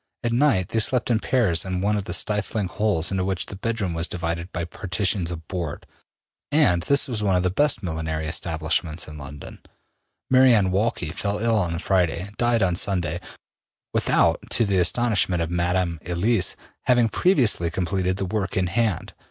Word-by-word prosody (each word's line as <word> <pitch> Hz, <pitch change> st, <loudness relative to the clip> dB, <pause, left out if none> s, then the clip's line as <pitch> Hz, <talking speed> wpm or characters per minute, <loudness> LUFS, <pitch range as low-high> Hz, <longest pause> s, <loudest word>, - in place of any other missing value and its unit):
At 120 Hz, -1 st, 0 dB
night, 120 Hz, -9 st, +2 dB
they 115 Hz, -, +1 dB
slept 125 Hz, +2 st, +1 dB
in 110 Hz, -, +3 dB
pairs 110 Hz, -10 st, +2 dB
in 95 Hz, -1 st, -3 dB
one 105 Hz, +3 st, +1 dB
of 100 Hz, -2 st, -2 dB
the -, -, -3 dB
stifling 105 Hz, 0 st, -1 dB
holes 100 Hz, -4 st, 0 dB
into 95 Hz, -1 st, 0 dB
which 95 Hz, -1 st, -2 dB
the -, -, -8 dB
bedroom 100 Hz, -3 st, -2 dB
was 85 Hz, +1 st, -1 dB
divided 85 Hz, +1 st, -3 dB
by 85 Hz, -2 st, -3 dB
partitions 95 Hz, 0 st, -1 dB
of 80 Hz, -2 st, -7 dB
board. 85 Hz, -6 st, -5 dB, 0.7 s
And 145 Hz, -, +3 dB
this 140 Hz, -, +3 dB
was 115 Hz, -5 st, -3 dB
one 100 Hz, -3 st, +2 dB
of 90 Hz, -, +1 dB
the 90 Hz, -, +1 dB
best 140 Hz, 0 st, +1 dB
millinery 80 Hz, -2 st, -3 dB
establishments 80 Hz, 0 st, -1 dB
in 75 Hz, -1 st, -9 dB
London. 70 Hz, 0 st, -9 dB, 0.7 s
Mary 130 Hz, -1 st, +6 dB
Anne 95 Hz, -3 st, +2 dB
Walkley 100 Hz, -4 st, 0 dB
fell 100 Hz, +5 st, -2 dB
ill 115 Hz, +1 st, +1 dB
on 85 Hz, -4 st, 0 dB
the -, -, -2 dB
Friday, 90 Hz, +1 st, 0 dB
died 120 Hz, -2 st, +3 dB
on 90 Hz, -2 st, +2 dB
Sunday, 90 Hz, -3 st, -1 dB, 0.7 s
without, -, -, +3 dB
to 115 Hz, -, +2 dB
the 100 Hz, -2 st, +1 dB
astonishment 95 Hz, -2 st, +2 dB
of 80 Hz, -, -5 dB
Madame 85 Hz, -1 st, 0 dB
Elise, 100 Hz, +7 st, +1 dB, 0.3 s
having 120 Hz, -2 st, +4 dB
previously 120 Hz, -, +2 dB
completed 95 Hz, +2 st, -1 dB
the 95 Hz, -, -2 dB
work 100 Hz, 0 st, -2 dB
in 95 Hz, -, +2 dB
hand. 105 Hz, 0 st, -1 dB
95 Hz, 180 wpm, -23 LUFS, 85-110 Hz, 0.7 s, Mary